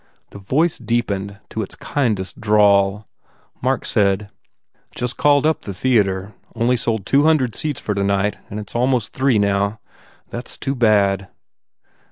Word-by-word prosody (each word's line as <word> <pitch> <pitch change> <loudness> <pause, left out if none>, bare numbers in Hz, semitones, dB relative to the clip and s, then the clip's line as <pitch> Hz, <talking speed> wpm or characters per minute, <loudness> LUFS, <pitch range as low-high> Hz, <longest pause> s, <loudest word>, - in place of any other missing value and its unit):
The 100 - -10
voice 150 - 0
deepened 100 -4 -2
to 110 - -3
its 100 - -6
kindest 105 -10 -2
drawl. 105 -1 +3 0.5
Mark - - 0
said, 100 0 +1 0.6
"Just 125 0 -3
called 145 0 +3
up 160 0 +1
the 100 - -7
theatre. 100 -4 +1 0.2
Only 120 +2 +2
sold 110 -4 -2
two 140 +6 +3
hundred 145 -8 +3
seats 150 -3 -3
for 105 - -2
tonight 100 +1 0
and 105 - -5
its 105 - -9
almost 125 0 +1
three, 130 -3 +2
now. 100 +1 +1 0.5
That 120 +1 -6
s - - -8
too 135 - -2
bad." 100 -6 +2
105 Hz, 150 wpm, -20 LUFS, 100-125 Hz, 0.6 s, drawl